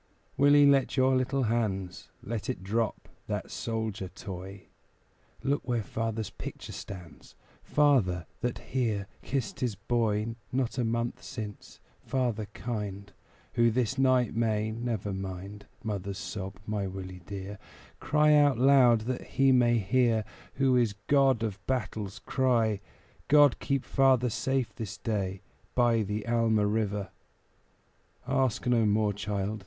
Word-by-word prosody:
Willie, 145 Hz, +1 st, +6 dB
fold 140 Hz, -2 st, +4 dB
your 130 Hz, 0 st, +4 dB
little 130 Hz, +1 st, +1 dB
hands; 105 Hz, -6 st, -2 dB
Let 115 Hz, +1 st, -4 dB
it 125 Hz, -, -3 dB
drop 110 Hz, +3 st, -1 dB, 0.2 s
that -, -, -3 dB
"soldier" 110 Hz, -4 st, -3 dB
toy; 95 Hz, +1 st, -8 dB, 0.8 s
Look 140 Hz, -1 st, 0 dB
where 120 Hz, -3 st, 0 dB
father's 115 Hz, 0 st, -3 dB
picture -, -, -8 dB
stands 90 Hz, -5 st, -10 dB, 0.3 s
Father, 115 Hz, -, +2 dB
that 120 Hz, -1 st, -2 dB, 0.2 s
here 110 Hz, -6 st, 0 dB, 0.2 s
kissed 125 Hz, -6 st, -3 dB
his 120 Hz, -5 st, -1 dB
boy 110 Hz, +1 st, 0 dB, 0.2 s
Not 125 Hz, -1 st, -1 dB
a -, -, +2 dB
month 115 Hz, +1 st, -1 dB
since 110 Hz, -5 st, -8 dB, 0.2 s
father 120 Hz, -5 st, -1 dB
kind, 100 Hz, -4 st, -5 dB, 0.4 s
Who 115 Hz, 0 st, +4 dB
this 125 Hz, +2 st, 0 dB
night 130 Hz, -4 st, +3 dB
may 110 Hz, -1 st, +1 dB
(never 110 Hz, -3 st, -3 dB
mind 95 Hz, +2 st, -6 dB, 0.2 s
Mother's 100 Hz, -3 st, -3 dB
sob, 95 Hz, 0 st, -5 dB
my 105 Hz, -2 st, -2 dB
Willie 95 Hz, -1 st, -7 dB
dear) 100 Hz, 0 st, -6 dB, 0.4 s
Cry 150 Hz, +2 st, +3 dB
out 145 Hz, -4 st, +5 dB
loud 125 Hz, -3 st, +6 dB
that 125 Hz, +3 st, -3 dB
He 135 Hz, 0 st, +2 dB
may 120 Hz, -2 st, +4 dB
hear 115 Hz, +1 st, +2 dB, 0.3 s
Who 135 Hz, -2 st, +3 dB
is 120 Hz, -4 st, +3 dB
God 135 Hz, -5 st, +3 dB
of 105 Hz, -2 st, -4 dB
battles 110 Hz, -6 st, -2 dB
cry, 115 Hz, -6 st, +1 dB, 0.5 s
"God 145 Hz, -3 st, +6 dB
keep 140 Hz, -2 st, -1 dB
father 130 Hz, -3 st, +3 dB
safe 130 Hz, +1 st, -1 dB
this 110 Hz, -6 st, -6 dB
day 100 Hz, -5 st, -2 dB, 0.3 s
By 120 Hz, -2 st, +3 dB
the 105 Hz, +1 st, -3 dB
Alma 115 Hz, -3 st, +2 dB
River!" 105 Hz, -1 st, -1 dB, 1.2 s
Ask 130 Hz, -3 st, +1 dB
no 120 Hz, -3 st, +3 dB
more, 105 Hz, 0 st, +2 dB
child. 105 Hz, +1 st, -3 dB
115 Hz, 135 wpm, -29 LUFS, 100-130 Hz, 1.2 s, Willie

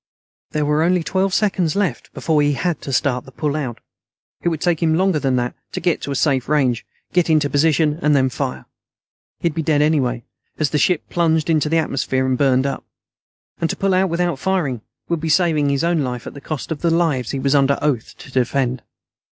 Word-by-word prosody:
There 150 Hz, -1 st, -1 dB
were 150 Hz, +1 st, +2 dB
only 175 Hz, +1 st, +2 dB
twelve 190 Hz, +3 st, 0 dB
seconds 185 Hz, -5 st, +1 dB
left 200 Hz, -3 st, -1 dB
before 155 Hz, -2 st, +1 dB
he 145 Hz, 0 st, +2 dB
had 170 Hz, +3 st, -2 dB
to 135 Hz, -, -6 dB
start 130 Hz, -1 st, +1 dB
the 135 Hz, -, -13 dB
pull 150 Hz, +2 st, -2 dB
out. 130 Hz, -7 st, -3 dB, 0.6 s
It 175 Hz, -, +1 dB
would 160 Hz, -3 st, -3 dB
take 175 Hz, -1 st, 0 dB
him 160 Hz, -1 st, +3 dB
longer 185 Hz, -2 st, +2 dB
than 135 Hz, -3 st, +1 dB
that 120 Hz, -1 st, -1 dB, 0.2 s
to -, -, -2 dB
get 175 Hz, -1 st, 0 dB
to -, -, -5 dB
a -, -, -2 dB
safe 135 Hz, -2 st, +1 dB
range, 130 Hz, -6 st, +1 dB, 0.3 s
get 175 Hz, -1 st, +2 dB
into 150 Hz, -3 st, +2 dB
position, 150 Hz, +1 st, +2 dB
and 140 Hz, -4 st, +2 dB
fire. 65 Hz, -8 st, -3 dB, 0.8 s
He'd 170 Hz, -2 st, 0 dB
be 165 Hz, -, -2 dB
dead 150 Hz, -1 st, +2 dB
anyway, 130 Hz, -6 st, +1 dB, 0.3 s
as 155 Hz, -3 st, 0 dB
the 150 Hz, -, +1 dB
ship 175 Hz, +2 st, +1 dB
plunged 165 Hz, -2 st, +1 dB
into 155 Hz, -1 st, +2 dB
the 165 Hz, -, +2 dB
atmosphere 130 Hz, -4 st, 0 dB
and 130 Hz, -1 st, +1 dB
burned 130 Hz, 0 st, +2 dB
up. 140 Hz, -1 st, -3 dB, 0.8 s
And 165 Hz, -, 0 dB
to -, -, -2 dB
pull 195 Hz, -1 st, 0 dB
out 185 Hz, +1 st, +2 dB
without 170 Hz, -3 st, -1 dB
firing 155 Hz, -, -1 dB, 0.3 s
would 170 Hz, -1 st, -1 dB
be 165 Hz, -, -2 dB
saving 155 Hz, -4 st, +3 dB
his 140 Hz, +2 st, 0 dB
own 170 Hz, -1 st, +2 dB
life 125 Hz, -4 st, -3 dB
at -, -, -7 dB
the 140 Hz, -, -10 dB
cost 155 Hz, +2 st, -5 dB
of 155 Hz, -, -3 dB
the 170 Hz, -, +2 dB
lives 160 Hz, -8 st, +1 dB
he 140 Hz, -, -2 dB
was 135 Hz, +1 st, +1 dB
under 140 Hz, -1 st, +3 dB
oath 140 Hz, -7 st, -1 dB
to -, -, -12 dB
defend. 130 Hz, 0 st, 0 dB
150 Hz, 215 wpm, -20 LUFS, 135-165 Hz, 0.8 s, him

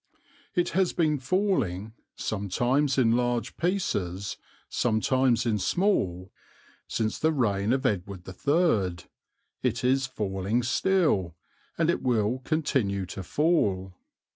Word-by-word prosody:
It 175 Hz, -, +2 dB
has 185 Hz, +1 st, +1 dB
been 155 Hz, -4 st, +1 dB
falling 125 Hz, -, 0 dB, 0.2 s
sometimes 120 Hz, +8 st, 0 dB
in 120 Hz, -4 st, +4 dB
large 120 Hz, 0 st, 0 dB
pieces, 100 Hz, -, -1 dB, 0.3 s
sometimes 120 Hz, +1 st, +1 dB
in 110 Hz, -3 st, +1 dB
small 95 Hz, -, 0 dB, 0.6 s
since 110 Hz, -1 st, -1 dB
the 160 Hz, -, +2 dB
reign 105 Hz, -7 st, +1 dB
of 135 Hz, +1 st, 0 dB
Edward 95 Hz, -4 st, -2 dB
III; 100 Hz, -, +1 dB, 0.6 s
it 120 Hz, -2 st, -1 dB
is 130 Hz, +1 st, +2 dB
falling 105 Hz, -1 st, -1 dB
still, 130 Hz, -, +1 dB, 0.4 s
and 165 Hz, 0 st, +3 dB
it -, -, -2 dB
will 120 Hz, 0 st, +1 dB
continue 125 Hz, -, 0 dB
to 95 Hz, +1 st, -7 dB
fall. 95 Hz, -, +1 dB
120 Hz, 115 wpm, -27 LUFS, 100-150 Hz, 0.6 s, in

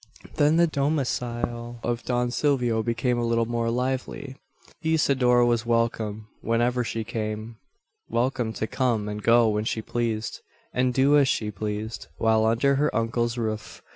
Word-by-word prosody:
Then 150 Hz, +2 st, +4 dB
the 170 Hz, -, +6 dB
domicile 120 Hz, -5 st, -2 dB
of 120 Hz, 0 st, -1 dB
Don 125 Hz, -1 st, 0 dB
Silvio 125 Hz, -5 st, +1 dB
became 120 Hz, +2 st, 0 dB
a -, -, 0 dB
little 115 Hz, 0 st, +1 dB
more 115 Hz, 0 st, -1 dB
lively. 130 Hz, +2 st, -2 dB, 0.5 s
Isidora 135 Hz, -7 st, +3 dB
was 120 Hz, -1 st, +2 dB
welcome 115 Hz, -2 st, -1 dB
whenever 120 Hz, +2 st, +1 dB
she 115 Hz, -1 st, -3 dB
came; 110 Hz, +1 st, -4 dB, 0.5 s
welcome 120 Hz, 0 st, 0 dB
to 110 Hz, -, -2 dB
come 115 Hz, -3 st, 0 dB
and 105 Hz, 0 st, -4 dB
go 115 Hz, +1 st, +5 dB
when 105 Hz, 0 st, 0 dB
she 110 Hz, -1 st, -2 dB
pleased; 115 Hz, -2 st, -2 dB, 0.3 s
and 125 Hz, 0 st, +2 dB
do 135 Hz, +3 st, +4 dB
as 140 Hz, -, +4 dB
she 105 Hz, -4 st, 0 dB
pleased, 105 Hz, +1 st, -4 dB
while 110 Hz, -1 st, +3 dB
under 135 Hz, +5 st, +2 dB
her 150 Hz, +2 st, +2 dB
uncle's 115 Hz, +1 st, 0 dB
roof. 110 Hz, -2 st, -4 dB
120 Hz, 150 wpm, -25 LUFS, 110-125 Hz, 0.5 s, the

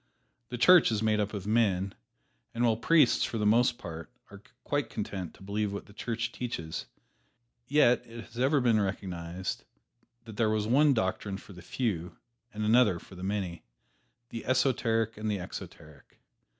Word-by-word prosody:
The 125 Hz, -, -4 dB
Church 175 Hz, +3 st, +6 dB
is 110 Hz, -1 st, 0 dB
made 110 Hz, -1 st, +2 dB
up 105 Hz, 0 st, -1 dB
of 100 Hz, -3 st, -6 dB
men, 100 Hz, -3 st, +1 dB, 0.6 s
and 120 Hz, -, 0 dB
while 115 Hz, -2 st, +3 dB
priests 140 Hz, +3 st, +4 dB
for 115 Hz, -, -2 dB
the 105 Hz, -, 0 dB
most 120 Hz, +3 st, +4 dB
part 80 Hz, -3 st, -8 dB, 0.2 s
are 100 Hz, -1 st, -12 dB, 0.2 s
quite 145 Hz, -1 st, -1 dB
content 95 Hz, -4 st, -5 dB
to -, -, -16 dB
believe 105 Hz, +1 st, -2 dB
what 100 Hz, -, -6 dB
the 100 Hz, -, -17 dB
Church 115 Hz, +2 st, -3 dB
teaches, 85 Hz, -12 st, -5 dB, 0.8 s
yet 135 Hz, -4 st, +4 dB
it 115 Hz, 0 st, -9 dB
has 120 Hz, -, -11 dB
ever 140 Hz, +3 st, +3 dB
been 115 Hz, -4 st, +3 dB
recognized 95 Hz, -2 st, -4 dB, 0.6 s
that 110 Hz, -3 st, -11 dB
there 110 Hz, -2 st, +2 dB
was 110 Hz, -1 st, 0 dB
one 140 Hz, +5 st, +4 dB
doctrine 95 Hz, -1 st, -1 dB
for 100 Hz, -, -13 dB
the 90 Hz, -, -11 dB
Few, 90 Hz, -4 st, -3 dB, 0.3 s
and 105 Hz, -1 st, -3 dB
another 110 Hz, -4 st, +4 dB
for 90 Hz, -, -14 dB
the 90 Hz, -, -10 dB
Many 95 Hz, -3 st, -3 dB, 0.7 s
the 115 Hz, -, -6 dB
esoteric 115 Hz, -4 st, +1 dB
and 110 Hz, 0 st, -3 dB
the 105 Hz, -, 0 dB
exoteric. 75 Hz, -4 st, -10 dB
110 Hz, 170 wpm, -29 LUFS, 95-120 Hz, 0.8 s, Church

